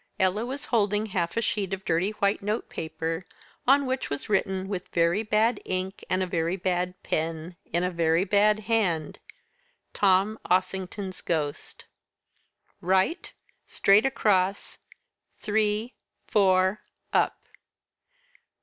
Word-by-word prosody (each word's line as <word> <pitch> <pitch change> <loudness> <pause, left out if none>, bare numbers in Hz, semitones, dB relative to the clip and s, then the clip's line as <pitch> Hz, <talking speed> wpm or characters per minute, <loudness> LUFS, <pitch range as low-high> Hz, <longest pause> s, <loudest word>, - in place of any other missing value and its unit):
Ella 190 +4 +2
was 275 +3 -4
holding 210 -1 +2
half 180 -2 -2
a 230 - +1
sheet 200 -3 -1
of 190 - -17
dirty 170 +5 +1
white 205 -1 0
notepaper, 165 -5 -3 0.4
on 275 +2 +5
which 260 0 -2
was 145 +6 -5
written, 190 -2 0
with 195 -2 -4
very 170 +4 +2
bad 220 +1 +1
ink 185 +1 -3
and 185 +1 +1
a - - 0
very 170 -1 -1
bad 180 -1 -1
pen, 160 +2 -2 0.2
in 170 +2 +1
a 180 - 0
very 165 0 +2
bad 210 +2 +3
hand: 200 -8 0 0.7
"TOM 200 +2 +2
OSSINGTON'S 185 +1 -1
GHOST." 150 -4 -3 1.0
"Right 190 - +1 0.4
Straight 205 +5 +4
across 195 -6 0 0.6
three 215 +2 0 0.3
four 190 0 +3 0.3
up. - - +2
190 Hz, 120 wpm, -26 LUFS, 180-210 Hz, 1.0 s, on